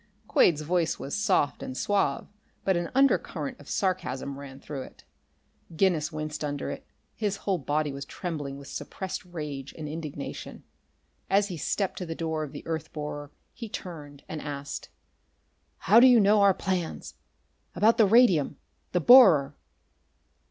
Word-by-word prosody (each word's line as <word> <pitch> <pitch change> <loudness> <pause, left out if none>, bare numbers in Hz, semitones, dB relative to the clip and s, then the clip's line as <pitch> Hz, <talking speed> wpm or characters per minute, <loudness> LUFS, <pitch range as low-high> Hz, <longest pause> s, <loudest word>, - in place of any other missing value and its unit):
Quade's 155 -4 +4
voice 170 +1 0
was 140 - -5
soft 195 -8 +1
and 130 - -6
suave, 195 -9 0 0.4
but 190 - +3
an 175 -1 -2
undercurrent 225 - +1
of 145 - -14
sarcasm 140 -8 -2
ran 135 -1 -10
through 140 -1 -6
it. - - -12 0.7
Guinness 165 -3 +2
winced 155 0 -5
under 145 -1 -3
it; - - -8 0.3
his 205 -2 -2
whole 190 -3 +1
body 145 +1 -1
was 140 0 -6
trembling 145 -4 -5
with 140 0 -11
suppressed 190 -1 -5
rage 150 -6 -7
and 155 -2 -5
indignation. 150 -2 -7 0.7
As 200 +1 +3
he 180 - -4
stepped 195 +4 -2
to 180 - -5
the 165 - -4
door 160 -1 -2
of 150 -3 -5
the - - -9
earth 160 -2 -4
borer 150 -1 -6 0.2
he 230 -3 -8
turned 150 -8 -8
and 155 -1 -5
asked: 145 -1 -6 0.9
"How 220 +4 +5
did 255 - +8
you 245 -2 +7
know 205 0 +5
our 200 -2 +5
plans? 185 -4 -3 0.6
About 220 +6 +4
the 215 - +6
radium? 190 - +4 0.4
the 180 - +2
borer?" 165 - +7
160 Hz, 155 wpm, -27 LUFS, 145-195 Hz, 0.9 s, did